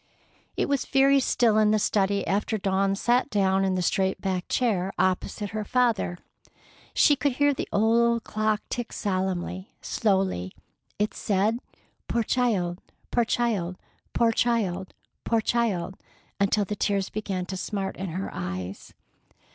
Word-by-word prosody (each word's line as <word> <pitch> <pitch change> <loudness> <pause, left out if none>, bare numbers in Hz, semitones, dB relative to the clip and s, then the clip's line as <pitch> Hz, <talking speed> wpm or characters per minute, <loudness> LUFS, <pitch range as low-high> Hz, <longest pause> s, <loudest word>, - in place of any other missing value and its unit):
It - - +1
was 280 -2 0
very 275 +1 +5
still 235 -4 +3
in 215 -1 +4
the 215 - +4
study 200 -1 +1
after 210 +3 0
Dawn 195 0 +1
sat 240 +6 +2
down 195 -3 +2
in 190 -1 +1
the 180 - 0
straight 190 +1 +1
backed 185 -2 -2
chair 195 -7 +1
opposite 185 +2 0
her 215 0 -3
father. 225 -6 +1 0.8
She 290 - +5
could 285 -1 0
hear 285 +2 +3
the - - -5
old 230 +2 +3
clock 215 0 -1
tick 240 -1 -4
solemnly, 185 -1 -2
slowly. 190 - 0 0.4
It 210 +1 0
said, 210 +3 0 0.5
"Poor 235 - +1
child! 205 -8 0 0.3
Poor 240 -1 +2
child! 205 -7 0 0.3
Poor 230 -1 +3
child! 205 -6 0 0.3
Poor 230 - +2
child!" 215 -6 0 0.4
until 200 +1 +2
the 210 - -3
tears 200 -1 0
began 195 -4 -3
to 190 - -5
smart 195 0 -3
in 190 - -4
her 185 +4 -4
eyes. 90 +1 -6
205 Hz, 145 wpm, -26 LUFS, 190-230 Hz, 0.8 s, very